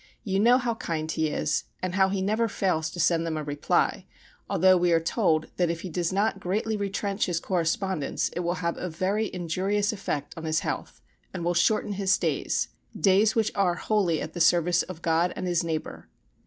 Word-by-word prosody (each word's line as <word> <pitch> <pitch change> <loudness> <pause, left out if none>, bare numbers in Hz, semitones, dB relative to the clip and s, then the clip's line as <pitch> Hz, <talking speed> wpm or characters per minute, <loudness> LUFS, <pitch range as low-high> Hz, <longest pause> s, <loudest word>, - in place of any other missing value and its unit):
You 195 -3 0
know 240 +4 +6
how 245 -2 -1
kind 160 -7 -3
he 160 0 0
is 150 - -1
and 185 -1 -3
how 190 0 +3
he 190 -1 -1
never 215 +4 +1
fails 170 -6 0
to 175 - -9
send 165 0 +3
them 165 -1 -2
a 155 - -3
reply, 145 0 0 0.4
although 185 +2 +5
we 175 -1 +2
are 165 - +5
told 165 -2 0
that 175 -2 +2
if 165 0 -3
he 185 - -6
does 170 +1 -1
not 195 +1 0
greatly 210 +4 -1
retrench 200 0 -1
his 175 -2 0
correspondence 175 -2 -1
it - - -5
will 175 0 -1
have 170 - -1
a 180 - -3
very 195 +6 -1
injurious 190 +4 -1
effect 150 -8 -4
on 165 -1 -7
his 155 0 +1
health, - - -5 0.3
and 170 -2 -4
will 175 - +2
shorten 205 +4 +2
his 195 0 +2
days - - -1 0.3
days 205 +3 +4
which 225 -2 +2
are 190 -3 +2
wholly 185 -8 +1
at - - -7
the 175 - -3
service 175 +1 +4
of 175 -3 -8
God 165 +2 +2
and 185 - -4
his 175 -2 +1
neighbour. 160 -2 -4
180 Hz, 205 wpm, -26 LUFS, 165-200 Hz, 0.4 s, know